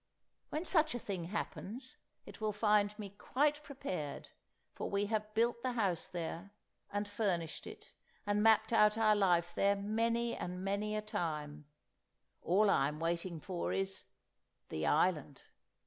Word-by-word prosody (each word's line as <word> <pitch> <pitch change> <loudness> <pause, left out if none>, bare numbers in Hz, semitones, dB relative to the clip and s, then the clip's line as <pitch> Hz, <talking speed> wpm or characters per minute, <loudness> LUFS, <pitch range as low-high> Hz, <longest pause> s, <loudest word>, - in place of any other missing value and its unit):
When 310 +4 -3
such 315 -6 +3
a - - -2
thing 190 -6 -4
happens, 220 +6 -5 0.3
it - - -12
will 215 -1 0
find 210 0 +3
me 205 -2 -6
quite 295 +2 +1
prepared, 185 - -5 0.4
for - - -4
we 200 +1 +1
have 215 0 -1
built 235 +1 +2
the 255 0 -1
house 195 -8 0
there, 175 +2 -5 0.4
and 205 0 -1
furnished 185 -6 -1
it, - - -11 0.3
and 205 0 +1
mapped 220 +1 +5
out 210 -1 +5
our 215 -1 +5
life 175 -4 +3
there 200 +1 +3
many 230 +3 0
and 180 +1 -5
many 205 +2 -1
a 215 - -2
time; 150 -8 -3 0.8
all 200 +5 +3
I 135 - +4
am 150 +1 -5
waiting 170 +1 -2
for 175 +2 -3
is—the 190 - -5
island! 150 -4 +1
205 Hz, 145 wpm, -35 LUFS, 175-220 Hz, 0.8 s, mapped